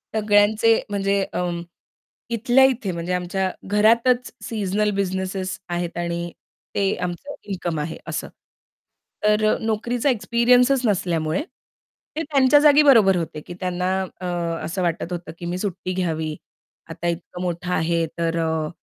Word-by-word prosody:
सगळ्यांचे 215 Hz, +1 st, +4 dB
म्हणजे 200 Hz, -1 st, +1 dB
अ, -, -, -1 dB, 0.9 s
इथल्या 240 Hz, +3 st, +4 dB
इथे 250 Hz, -7 st, 0 dB
म्हणजे 170 Hz, +1 st, -3 dB
आमच्या 185 Hz, +1 st, -1 dB, 0.2 s
घरातच 235 Hz, +4 st, +3 dB
सीझनल 210 Hz, -1 st, 0 dB
बिझनेसेस 190 Hz, -1 st, -2 dB
आहेत 175 Hz, -1 st, -3 dB
आणि 170 Hz, 0 st, -3 dB, 0.4 s
ते 195 Hz, -1 st, +1 dB
आमचं 180 Hz, +12 st, -6 dB
इन्कम 175 Hz, -5 st, -3 dB
आहे 155 Hz, +2 st, -4 dB
असं. -, -, -3 dB, 1.0 s
तर 210 Hz, 0 st, +3 dB
अ, -, -, -4 dB
नोकरीचा 230 Hz, +4 st, 0 dB
एक्सपिरियन्सच 245 Hz, +2 st, +3 dB
नसल्यामुळे 175 Hz, -, 0 dB, 0.7 s
ते 315 Hz, -, -1 dB
त्यांच्या 285 Hz, -1 st, +4 dB
जागी 300 Hz, 0 st, +7 dB
बरोबर 225 Hz, -9 st, +6 dB
होते 160 Hz, -3 st, -4 dB
की 175 Hz, -, -9 dB
त्यांना 180 Hz, 0 st, -1 dB, 0.3 s
अ, -, -, -4 dB, 0.4 s
असं 180 Hz, +4 st, -3 dB
वाटत 170 Hz, 0 st, -2 dB
होतं 175 Hz, 0 st, -6 dB
की 175 Hz, -, -6 dB
मी 175 Hz, +1 st, -2 dB
सुट्टी 185 Hz, -1 st, -3 dB
घ्यावी. 160 Hz, -4 st, -2 dB, 0.5 s
आता 165 Hz, +1 st, -4 dB
इतकं 170 Hz, +1 st, -4 dB
मोठं 180 Hz, 0 st, -3 dB
आहे 165 Hz, 0 st, +1 dB
तर 165 Hz, 0 st, 0 dB
अ, 160 Hz, -1 st, -1 dB
190 Hz, 135 wpm, -22 LUFS, 175-220 Hz, 1.0 s, जागी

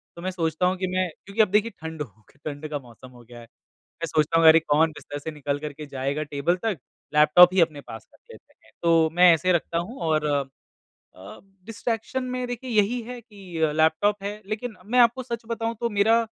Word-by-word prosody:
तो 170 Hz, -, -10 dB
मैं 185 Hz, +1 st, -3 dB
सोचता 165 Hz, -1 st, -1 dB
हूँ 185 Hz, +1 st, +1 dB
कि 185 Hz, 0 st, -2 dB
मैं 185 Hz, -1 st, +1 dB, 0.2 s
क्योंकि 200 Hz, +3 st, +1 dB
अब 215 Hz, -, +4 dB
देखिए 215 Hz, +2 st, +2 dB
ठंड 160 Hz, -1 st, -6 dB
हो 110 Hz, -6 st, -8 dB
क -, -, -25 dB
ठंड 150 Hz, 0 st, -5 dB
का 145 Hz, -1 st, -3 dB
मौसम 125 Hz, 0 st, -15 dB
हो 120 Hz, -1 st, -16 dB
गया 120 Hz, 0 st, -13 dB
है, 115 Hz, -, -12 dB
मैं 165 Hz, +7 st, -12 dB
सोचता 155 Hz, +2 st, +2 dB
हूँ 165 Hz, -, +6 dB
अरे! 160 Hz, +1 st, +8 dB
कौन 160 Hz, +1 st, +2 dB
बिस्तर 145 Hz, -, -8 dB
से 160 Hz, +2 st, -6 dB
निकल 145 Hz, -1 st, -3 dB
कर 150 Hz, -1 st, -6 dB
के 150 Hz, +1 st, -9 dB
जाएगा 140 Hz, +2 st, -3 dB
टेबल 145 Hz, +4 st, -1 dB
तक 215 Hz, -5 st, 0 dB, 0.4 s
लैपटॉप 155 Hz, +4 st, +7 dB
ही 190 Hz, -, +4 dB
अपने 155 Hz, -4 st, 0 dB
पास 110 Hz, -3 st, -11 dB
रख -, -, -23 dB
लेते -, -, -17 dB
हैं। -, -, -22 dB
तो 165 Hz, -1 st, +4 dB
मैं 180 Hz, 0 st, +7 dB
ऐसे 185 Hz, +3 st, +1 dB
रखता 170 Hz, 0 st, -1 dB
हूँ 185 Hz, +10 st, -4 dB
और 155 Hz, -2 st, +1 dB
अ, 145 Hz, -2 st, +1 dB, 0.7 s
अ, 95 Hz, +1 st, -12 dB, 0.3 s
डिस्ट्रैक्शन 230 Hz, +3 st, -3 dB
में 250 Hz, 0 st, -3 dB
देखिए 245 Hz, +1 st, -6 dB
यही 220 Hz, +3 st, +2 dB
है 245 Hz, +1 st, -8 dB
कि 185 Hz, -8 st, -3 dB
लैपटॉप 195 Hz, +6 st, +2 dB
है, 205 Hz, +1 st, -5 dB
लेकिन 215 Hz, 0 st, -5 dB
मैं 245 Hz, +4 st, +1 dB
आपको 240 Hz, +2 st, +4 dB
सच 235 Hz, -2 st, -5 dB
बताऊँ 230 Hz, 0 st, -3 dB
तो 235 Hz, -1 st, -1 dB
मेरा 220 Hz, +3 st, +3 dB
अ, 230 Hz, -, -6 dB
170 Hz, 225 wpm, -24 LUFS, 150-215 Hz, 0.7 s, अरे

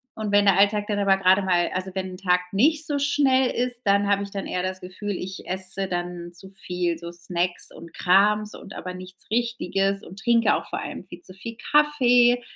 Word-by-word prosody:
Und 215 Hz, -2 st, -4 dB
wenn 205 Hz, 0 st, +5 dB
der 195 Hz, -1 st, +5 dB
Alltag 205 Hz, +1 st, +3 dB
dann 205 Hz, -1 st, -1 dB
aber 195 Hz, -1 st, +3 dB
gerade 190 Hz, +1 st, +4 dB
mal 180 Hz, -2 st, +1 dB
also 185 Hz, +1 st, -3 dB
wenn 190 Hz, -1 st, -3 dB
'n -, -, -10 dB
Tag 180 Hz, -1 st, +2 dB
nicht 300 Hz, +8 st, +3 dB
so 290 Hz, -, -1 dB
schnell 270 Hz, -2 st, +2 dB
ist, 245 Hz, 0 st, -2 dB
dann 200 Hz, 0 st, +3 dB
habe 200 Hz, 0 st, +2 dB
ich 200 Hz, -, -8 dB
dann 195 Hz, -1 st, -5 dB
eher 180 Hz, -, -2 dB
das 185 Hz, 0 st, -3 dB
Gefühl, 185 Hz, +3 st, -6 dB
ich 190 Hz, 0 st, -6 dB
esse 190 Hz, +1 st, -1 dB
dann 175 Hz, -1 st, -4 dB
zu 190 Hz, +2 st, -12 dB
viel, 180 Hz, -3 st, -3 dB
so, 170 Hz, +1 st, -8 dB
Snacks 175 Hz, +1 st, -2 dB
und 170 Hz, -1 st, -12 dB
Krams 210 Hz, +3 st, +2 dB
und 195 Hz, -, -11 dB
aber 185 Hz, 0 st, -6 dB
nichts 185 Hz, 0 st, -10 dB
Richtiges 195 Hz, -4 st, 0 dB
und 190 Hz, +3 st, -11 dB
trinke 230 Hz, -1 st, +3 dB
auch -, -, -4 dB
vor -, -, -3 dB
allem -, -, -6 dB
viel 175 Hz, -1 st, -11 dB
zu 185 Hz, -, -12 dB
viel 225 Hz, +4 st, -8 dB, 0.2 s
Kaffee. 245 Hz, -5 st, +4 dB
195 Hz, 215 wpm, -24 LUFS, 185-220 Hz, 0.2 s, wenn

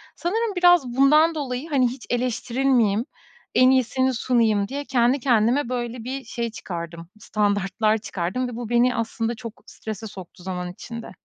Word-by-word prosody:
Sanırım 420 Hz, +4 st, -1 dB
biraz 355 Hz, -6 st, +5 dB
bundan 305 Hz, +4 st, +5 dB
dolayı, 270 Hz, +1 st, -4 dB
hani, 265 Hz, -5 st, +3 dB
hiç 245 Hz, +1 st, -7 dB
eleştirilmeyeyim, 245 Hz, -2 st, +1 dB, 0.5 s
en 255 Hz, 0 st, +6 dB
iyisini 260 Hz, 0 st, +2 dB
sunayım 225 Hz, -5 st, +2 dB
diye 285 Hz, +2 st, -5 dB
kendi 250 Hz, +1 st, +2 dB
kendime 240 Hz, +1 st, +2 dB
böyle 240 Hz, -2 st, -3 dB
bir 265 Hz, +2 st, -5 dB
şey 235 Hz, 0 st, -4 dB
çıkardım, 170 Hz, -4 st, -7 dB
standartlar 205 Hz, +1 st, +1 dB
çıkardım 205 Hz, +4 st, -3 dB
ve 235 Hz, -, -7 dB
bu 240 Hz, -2 st, -6 dB
beni 245 Hz, +1 st, +3 dB
aslında 230 Hz, 0 st, -2 dB
çok 225 Hz, -3 st, -10 dB
strese 220 Hz, 0 st, -7 dB
soktu 185 Hz, -3 st, -11 dB
zaman 180 Hz, -1 st, -4 dB
içinde. 230 Hz, +5 st, -8 dB
240 Hz, 150 wpm, -23 LUFS, 215-260 Hz, 0.5 s, en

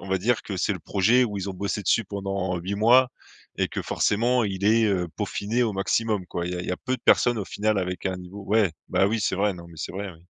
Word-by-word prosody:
on 95 Hz, -, -10 dB
va 95 Hz, 0 st, +1 dB
dire 115 Hz, +5 st, +1 dB
que 100 Hz, -, -5 dB
c'est 100 Hz, -, +1 dB
le 90 Hz, -, -8 dB
projet 115 Hz, +9 st, +3 dB
où 105 Hz, -3 st, -3 dB
ils 95 Hz, +1 st, -4 dB
ont 95 Hz, -, -7 dB
bossé 100 Hz, +2 st, -3 dB
dessus 115 Hz, -, +2 dB
pendant 95 Hz, -2 st, -3 dB
8 95 Hz, +4 st, -3 dB
mois 120 Hz, +5 st, +5 dB, 0.5 s
et -, -, +1 dB
que -, -, -4 dB
forcément 120 Hz, +3 st, +1 dB
il 95 Hz, -1 st, -3 dB
est, 110 Hz, +2 st, +4 dB
heu, 90 Hz, -3 st, +1 dB
peaufiné 115 Hz, +5 st, -1 dB
au 110 Hz, -, -1 dB
maximum, 100 Hz, 0 st, 0 dB
quoi. 85 Hz, -1 st, -4 dB
Il 90 Hz, -, -3 dB
y -, -, -3 dB
a -, -, -3 dB
il -, -, -7 dB
y -, -, 0 dB
a -, -, -2 dB
peu 130 Hz, 0 st, -2 dB
de -, -, -26 dB
personnes, 120 Hz, -2 st, +4 dB
au 100 Hz, -, -2 dB
final, 105 Hz, -1 st, 0 dB
avec 90 Hz, +1 st, -3 dB
un 95 Hz, -1 st, -2 dB
niveau 90 Hz, +3 st, -9 dB
Ouais, 105 Hz, -5 st, +2 dB, 0.2 s
bah, 95 Hz, -, +3 dB
oui 110 Hz, 0 st, -1 dB
c'est 95 Hz, -, 0 dB
vrai, 100 Hz, -1 st, +1 dB
non, 85 Hz, -1 st, -11 dB
mais 85 Hz, -, -14 dB
c'est -, -, -5 dB
vrai, 100 Hz, 0 st, -5 dB
oui. 85 Hz, +2 st, -21 dB
100 Hz, 285 wpm, -25 LUFS, 95-110 Hz, 0.5 s, mois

